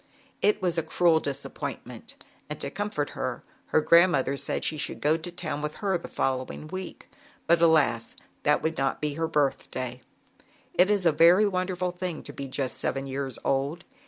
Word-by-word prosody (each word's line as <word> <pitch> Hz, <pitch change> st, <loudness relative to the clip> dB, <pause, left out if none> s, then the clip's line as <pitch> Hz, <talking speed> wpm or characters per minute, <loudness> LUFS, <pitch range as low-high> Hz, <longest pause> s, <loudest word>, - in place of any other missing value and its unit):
It 205 Hz, -2 st, +2 dB
was 175 Hz, -2 st, +1 dB
a -, -, +1 dB
cruel 160 Hz, +1 st, +3 dB
disappointment, 140 Hz, -3 st, -5 dB, 0.3 s
and -, -, -5 dB
to -, -, -4 dB
comfort 205 Hz, -8 st, -2 dB
her, 130 Hz, -2 st, -4 dB, 0.2 s
her 155 Hz, -, +3 dB
grandmother 170 Hz, -5 st, +4 dB
said -, -, -1 dB
she 160 Hz, -, +1 dB
should 150 Hz, -, -3 dB
go 150 Hz, +2 st, +3 dB
to 165 Hz, +2 st, -5 dB
town 165 Hz, -4 st, -4 dB
with 150 Hz, 0 st, -3 dB
her 195 Hz, -2 st, 0 dB
the 170 Hz, -, -4 dB
follow 130 Hz, -1 st, -1 dB
ing 155 Hz, -, -8 dB
week, 185 Hz, 0 st, -7 dB, 0.4 s
but, 170 Hz, 0 st, +4 dB
alas, 150 Hz, -9 st, +3 dB, 0.3 s
that 150 Hz, -, +2 dB
would 160 Hz, -1 st, -1 dB
not 135 Hz, 0 st, +1 dB
on 150 Hz, -, -1 dB
her 165 Hz, +2 st, -1 dB
birthday. 130 Hz, -4 st, -1 dB, 0.7 s
It 185 Hz, +2 st, +4 dB
is 205 Hz, -3 st, +2 dB
a 165 Hz, -, +6 dB
very 170 Hz, +7 st, +6 dB
wonderful 185 Hz, -2 st, -1 dB
thing 180 Hz, -2 st, -5 dB
to 145 Hz, -, -9 dB
be 140 Hz, -1 st, -6 dB
just 130 Hz, 0 st, -2 dB
seven 135 Hz, 0 st, -2 dB
years 135 Hz, -2 st, -4 dB
old. 140 Hz, +5 st, 0 dB
160 Hz, 185 wpm, -27 LUFS, 140-175 Hz, 0.7 s, a